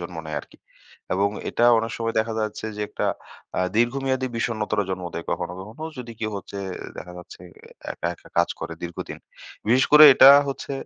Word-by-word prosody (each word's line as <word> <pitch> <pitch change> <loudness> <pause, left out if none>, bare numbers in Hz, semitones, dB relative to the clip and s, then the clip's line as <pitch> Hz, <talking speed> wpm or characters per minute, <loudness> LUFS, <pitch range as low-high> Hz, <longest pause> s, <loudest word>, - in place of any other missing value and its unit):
জন্ম 85 -1 -7
নেয় 75 -1 -4
আরকি। - - -19 0.6
এবং 100 +2 +2 0.2
এটা 120 - +1
অনেক 115 +1 -3
সময় 115 0 -2
দেখা 110 0 -3
যাচ্ছে, 110 0 -4
যে 105 - -5
একটা - - -4 0.5
আ - - +2 0.2
দীর্ঘমেয়াদী 130 +2 +1
বিষণ্ণতারও 105 -3 -1
জন্ম 90 -1 -4
দেয় 85 - -5
কখনো, 90 0 -3
কখনো 110 +10 -10 0.2
যদি 120 -2 -7
কেউ 110 -1 -2
হচ্ছে 100 +1 -9 0.4
দেখা 90 - -8
যাচ্ছে 90 - -12 0.4
অ্যা - - -7
একা, - - -3
একা - - -19
কাজ - - +3
করে 85 - -5
দীর্ঘদিন। 85 0 -6 0.5
বিশেষ 130 +3 +4
করে 150 +1 +10
এটা 135 - +9 0.2
হচ্ছে 140 0 -5
110 Hz, 180 wpm, -24 LUFS, 95-120 Hz, 0.6 s, করে